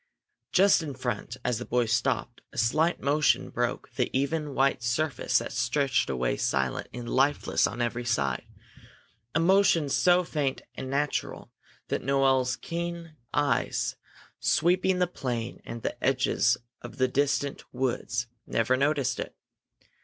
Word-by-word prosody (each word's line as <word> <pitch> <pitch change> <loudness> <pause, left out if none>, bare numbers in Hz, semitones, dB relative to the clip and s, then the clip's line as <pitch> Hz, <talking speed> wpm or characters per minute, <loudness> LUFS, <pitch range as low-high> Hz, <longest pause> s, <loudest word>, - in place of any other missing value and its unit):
Just 195 -1 +5
in 145 -4 -5
front, 120 0 -4
as 125 -2 0
the - - -4
boy 120 0 +1
stopped, 115 +2 -1
a - - -13
slight 155 +9 +2
motion 145 +2 +2
broke - - -2
the - - 0
even 145 +1 -1
white 135 -1 +2
surface 120 +4 0
that - - -2
stretched 130 +3 +1
away 60 -2 0
silent 65 -1 -1
and 120 -1 -7
lifeless 135 +4 +2
on 120 - -3
every 120 +1 -2
side, 70 - -1 0.9
a - - +4
motion 180 -3 +4
so 180 +5 +4
faint 145 -5 -2
and 130 - -6
natural 145 +2 -2 0.4
that - - -1
Noel's 135 -1 +2
keen 170 0 -5 0.2
eyes, 145 -1 0 0.4
sweeping 180 +3 +2
the 180 - +3
plain 120 -9 -4
and 115 -1 -7
the 120 - -4
edges 125 -2 +2 0.2
of 120 - -10
the 130 -1 +3
distant 140 +1 0
woods, 120 -2 -1 0.2
never 115 +3 +2
noticed 140 -2 +1
it. - - -5
135 Hz, 140 wpm, -28 LUFS, 120-155 Hz, 0.9 s, Just